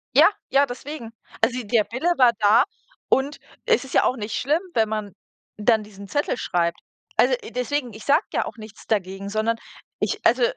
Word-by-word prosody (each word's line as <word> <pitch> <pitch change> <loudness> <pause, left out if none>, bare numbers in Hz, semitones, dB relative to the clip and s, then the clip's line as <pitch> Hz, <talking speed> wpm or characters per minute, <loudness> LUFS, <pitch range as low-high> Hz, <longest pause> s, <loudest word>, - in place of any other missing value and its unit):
Ja, - - +8 0.2
ja, 275 +1 +4
deswegen. 255 -1 -7 0.3
Also 245 +3 +2
der 215 0 +2
Wille 260 +9 -2
war 250 -2 +6
da 210 +1 +6 0.5
und 280 +2 +2 0.3
es 465 -8 +3
ist 270 - -10
ja - - +5
auch 255 - +2
nicht 220 -2 -5
schlimm, 300 +6 +1
wenn 220 -1 +3
man 215 -1 -3 0.5
dann 215 +1 +3
diesen 200 -1 -12
Zettel 290 +4 -1
schreibt. 170 -5 0 0.4
Also, - - +5
äh, 440 - -9
deswegen, 250 0 -2
ich 215 +1 -11
sage 290 +4 +4
ja - - +1
auch - - -7
nichts 215 -2 -12
dagegen, 195 -1 -1
sondern 220 +2 0 0.4
ich, - - 0
äh - - -31
also - - +4
230 Hz, 195 wpm, -23 LUFS, 210-270 Hz, 0.5 s, Ja